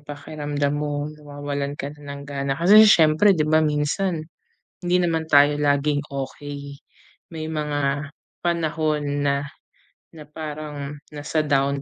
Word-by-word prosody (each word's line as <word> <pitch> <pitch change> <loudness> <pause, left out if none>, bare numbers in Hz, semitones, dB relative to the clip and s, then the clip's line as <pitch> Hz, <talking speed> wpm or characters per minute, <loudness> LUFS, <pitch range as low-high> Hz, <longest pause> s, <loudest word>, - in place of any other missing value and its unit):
pakiramdam 145 0 -3
mo 145 0 -2
nawawalan 145 -1 -5
ka 140 - -4
na 140 -1 -7
ng - - -9
gana? 140 -1 -2
Kasi 200 +6 +8
siyempre, 160 +2 +5
'di 155 -2 +1
ba, 155 0 +4
minsan 155 +3 0 0.6
hindi 175 +1 +2
naman 165 -2 0
tayo 145 0 +6
laging 145 0 +2
okey. 140 +1 -6 0.5
May 155 -1 -5
mga 145 -1 -1 0.3
panahon 155 -3 0 0.2
na 140 0 +3 0.8
na 155 - -9
parang 150 -2 -6 0.2
nasa 150 +2 -1
down 140 -1 +1
145 Hz, 125 wpm, -23 LUFS, 145-155 Hz, 0.8 s, Kasi